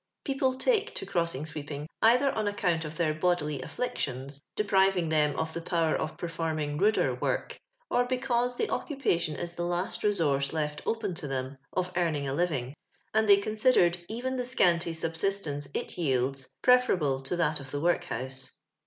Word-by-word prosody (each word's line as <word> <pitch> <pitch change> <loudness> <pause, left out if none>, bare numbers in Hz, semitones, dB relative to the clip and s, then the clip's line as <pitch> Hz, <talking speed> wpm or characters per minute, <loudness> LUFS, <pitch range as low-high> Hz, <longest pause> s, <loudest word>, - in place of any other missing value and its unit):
People 270 -2 +1
take 440 - +1
to - - -4
crossing 170 -5 -1
sweeping 150 -1 -6
either 250 +5 +5
on 215 -2 -1
account 180 -6 0
of 155 +1 -6
tlieir 155 -3 0
bodily 150 -6 +1
afflictions, 135 - -3
depriving 195 -4 +2
them 150 -2 +2
of 160 0 -2
the 170 - -4
power 165 -2 +1
of 155 - -2
x>erforming 160 -3 -2
ruder 215 +2 +3
work, - - -2 0.3
or 245 - +2
because 250 -1 0
tho 440 - 0
occupation 175 - 0
is 170 +2 -4
tho 175 0 -3
last 175 +2 -1
resource 150 -9 +1
left 150 -1 -2
open 220 -4 -1
to 165 -3 -5
them 130 0 -3 0.2
of 180 -1 -1
earning 160 -5 0
a 135 - -1
living, 140 -5 -1 0.4
nnd 220 0 +3
they 200 -1 +8
considered 215 -3 +3
even 255 +4 -3
the 250 - -1
scanty 175 -9 +3
sub^istene6 165 -2 -1
it - - -3
yields 135 -3 0 0.2
preferable 180 - +4
to 135 +6 -3
tliat 155 -3 +2
of 135 -1 -9
the 145 - -3
work 175 +2 +1
house. 130 -2 -5
170 Hz, 170 wpm, -29 LUFS, 150-210 Hz, 0.4 s, they